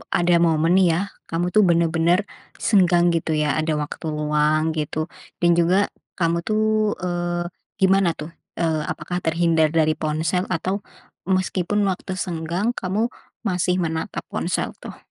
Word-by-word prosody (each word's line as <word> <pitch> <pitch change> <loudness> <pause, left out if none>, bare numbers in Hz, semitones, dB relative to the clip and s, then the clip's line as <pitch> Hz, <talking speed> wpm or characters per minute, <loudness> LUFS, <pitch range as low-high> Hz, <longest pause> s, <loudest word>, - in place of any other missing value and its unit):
ada 175 0 +2
momen 165 +1 +2
nih 190 -1 +5
ya - - 0 0.3
kamu 165 +2 -1
tuh 215 - +6
bener-bener 170 +1 +3 0.5
senggang 180 -5 +4
gitu 165 -1 -1
ya, 150 - 0
ada 155 0 0
waktu 150 - -7
luang 150 +1 +1
gitu 150 0 -3 0.4
dan 175 - +4
juga 175 +2 +3 0.4
kamu 170 -1 +2
tuh, 215 0 +1 0.4
eee, 175 0 -1 0.4
gimana 190 -1 +4
tuh, 155 +2 -7 0.2
eee, 160 -2 0
apakah 180 - -4
terhindar 165 -1 +3
dari 155 0 +4
ponsel 160 +4 -1
atau 185 +3 -1 0.5
meskipun 190 +2 +1
waktu 190 0 -2
senggang 175 +4 -2
kamu 215 +3 -1 0.3
masih 180 -3 +1
menatap 160 -3 -3
ponsel - - -1
tuh? - - -9
175 Hz, 140 wpm, -22 LUFS, 160-185 Hz, 0.5 s, tuh